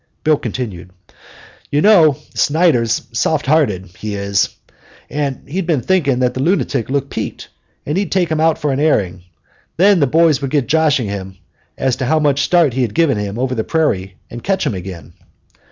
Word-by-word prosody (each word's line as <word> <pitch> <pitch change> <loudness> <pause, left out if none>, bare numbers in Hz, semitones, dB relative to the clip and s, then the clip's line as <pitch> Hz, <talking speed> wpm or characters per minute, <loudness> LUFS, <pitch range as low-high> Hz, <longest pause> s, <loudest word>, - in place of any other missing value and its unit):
Bill 155 -1 +4
continued: 105 -8 -5 0.8
"You 145 +1 +1
know, 165 -10 +5 0.2
Snyder's 145 -8 +2
soft 145 +6 0
hearted, 130 - +1
he 105 -1 -4
is. 100 0 0 0.6
Well, 140 -1 -1
he'd 180 +4 -3 0.2
think 185 -2 +2
that 125 -1 +1
lunatic 135 - 0
looked 140 0 -2
peaked, - - -5 0.4
and 150 - -2
he'd 195 +1 -1
take 180 -4 +1
him 155 - 0
out 160 0 +3
for 150 - -1
an 135 - -1
airing. 95 - +1 0.6
Then 195 +2 +5
the 140 - +3
boys 155 0 +3
would 135 - -2
get 140 -2 +1
joshing 150 -4 +2
him 95 -1 -6 0.4
as 130 -2 0
to 130 - -2
how 160 - +2
much 145 -2 +2
start 170 -7 +3
he 130 - -1
could 115 -4 -2
give 165 -4 +3
him 105 -3 -3
over 130 +1 -1
the 110 -3 -1
prairie 95 - -1 0.2
and 120 - -8
catch 195 -1 0
him - - 0
again." 90 -2 -8
140 Hz, 180 wpm, -17 LUFS, 115-160 Hz, 0.8 s, know